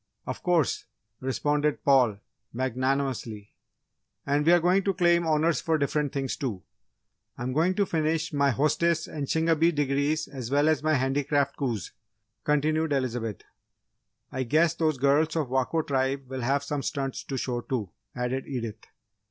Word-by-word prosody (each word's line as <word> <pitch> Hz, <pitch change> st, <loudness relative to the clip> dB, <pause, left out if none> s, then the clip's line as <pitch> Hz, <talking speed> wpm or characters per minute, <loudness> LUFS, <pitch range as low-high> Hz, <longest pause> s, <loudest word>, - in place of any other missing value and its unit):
"Of -, -, -5 dB
course!" 175 Hz, -6 st, +1 dB, 0.3 s
responded 145 Hz, +3 st, 0 dB
Paul, 125 Hz, -7 st, +4 dB, 0.4 s
magnanimously. 130 Hz, -3 st, -2 dB, 0.7 s
"And 145 Hz, +1 st, +1 dB
we're 175 Hz, +3 st, +6 dB
going 180 Hz, +3 st, +3 dB
to 195 Hz, -2 st, +1 dB
claim 170 Hz, -1 st, +3 dB
Honours 160 Hz, +1 st, +2 dB
for 160 Hz, -1 st, +1 dB
different 145 Hz, 0 st, 0 dB
things, 135 Hz, -2 st, -2 dB
too! 110 Hz, -9 st, -4 dB, 0.7 s
I'm 125 Hz, +1 st, -3 dB
going 170 Hz, +6 st, +2 dB
to 200 Hz, -, +2 dB
finish 160 Hz, -1 st, -1 dB
my 140 Hz, -1 st, +3 dB
Hostess 155 Hz, +5 st, +1 dB
and 145 Hz, -3 st, -5 dB
Shingebis 165 Hz, 0 st, +2 dB
Degrees 145 Hz, +2 st, 0 dB
as 130 Hz, -4 st, -6 dB
well 145 Hz, +3 st, +3 dB
as 155 Hz, -, +2 dB
my 155 Hz, 0 st, +2 dB
Handicraft 140 Hz, +1 st, +1 dB
coups," 115 Hz, -, -3 dB, 0.5 s
continued 155 Hz, +1 st, +1 dB
Elizabeth. 120 Hz, -6 st, -2 dB, 0.9 s
"I 130 Hz, -, -3 dB
guess 155 Hz, +6 st, +3 dB
those 155 Hz, -3 st, 0 dB
girls 145 Hz, +4 st, +2 dB
of 155 Hz, -6 st, -1 dB
Wako 130 Hz, +5 st, 0 dB
Tribe 135 Hz, -1 st, -1 dB
will 130 Hz, 0 st, -5 dB
have 135 Hz, +4 st, +1 dB
some 145 Hz, 0 st, -2 dB
stunts 135 Hz, -1 st, -3 dB
to 135 Hz, -, -4 dB
show, 120 Hz, -1 st, -2 dB
too," 115 Hz, -8 st, -3 dB, 0.2 s
added 125 Hz, +2 st, -2 dB
Edith. 115 Hz, -5 st, -5 dB
140 Hz, 150 wpm, -27 LUFS, 130-155 Hz, 0.9 s, we're